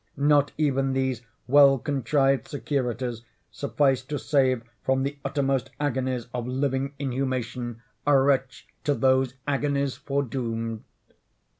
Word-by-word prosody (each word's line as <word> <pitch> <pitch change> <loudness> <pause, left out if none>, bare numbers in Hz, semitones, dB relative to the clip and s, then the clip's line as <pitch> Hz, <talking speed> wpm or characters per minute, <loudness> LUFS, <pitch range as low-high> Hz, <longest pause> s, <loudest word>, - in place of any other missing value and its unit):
Not 145 0 +3
even 135 -3 +1
these 130 -2 0 0.2
well 140 +1 +6
contrived 135 +1 +1
securities 125 -5 -2 0.3
sufficed 130 +4 0
to 150 - -1
save 130 -5 +2 0.2
from 130 0 +1
the 140 +1 -3
uttermost 135 -2 0
agonies 130 -4 -1
of 120 -1 -3
living 135 +1 -1
inhumation, 125 -3 -3 0.2
a 145 -1 +6
wretch 135 -1 +1 0.2
to 145 - +1
these 130 -1 +2
agonies 140 -1 0
foredoomed! 115 -5 -3
135 Hz, 115 wpm, -26 LUFS, 125-140 Hz, 0.3 s, well